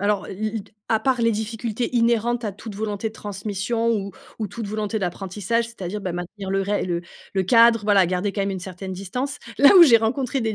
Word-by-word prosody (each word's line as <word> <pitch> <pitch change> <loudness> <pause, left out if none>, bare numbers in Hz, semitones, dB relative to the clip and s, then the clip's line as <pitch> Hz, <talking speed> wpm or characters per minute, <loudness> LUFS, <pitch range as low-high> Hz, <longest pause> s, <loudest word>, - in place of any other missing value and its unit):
alors 205 0 0
l 190 - -8 0.2
l 220 - -3
d 210 - -24 0.2
à 220 - +3
part 260 -3 +1
les 230 - +3
difficultés 225 +2 -3
inhérentes 235 0 +2
à - - -1
toute 205 +2 -9
volonté 210 +1 -3
de - - -14
transmission 210 +3 -2
ou 200 -3 -1 0.3
ou 215 - -2
toute 225 +2 -6
volonté 215 +1 -2
d'apprentissage, 195 +4 -2
c'est-à-dire, 210 -3 -6
bah, 185 -3 -3
maintenir 185 +3 -6
le 195 0 +1
ré 205 +1 0
le 170 -1 -2 0.3
le 190 - +2
cadre, 230 +2 +5
voila 200 -3 +4
garder 185 +3 -1
quand 200 - -3
même 195 - 0
une 190 - -3
certaine 190 0 -7
distance. 250 +10 -4 0.2
Là 285 +8 +8
où 360 - +11
j'ai 245 -9 +8
rencontré 250 +4 -1
des 220 -2 -1
210 Hz, 220 wpm, -23 LUFS, 195-230 Hz, 0.3 s, où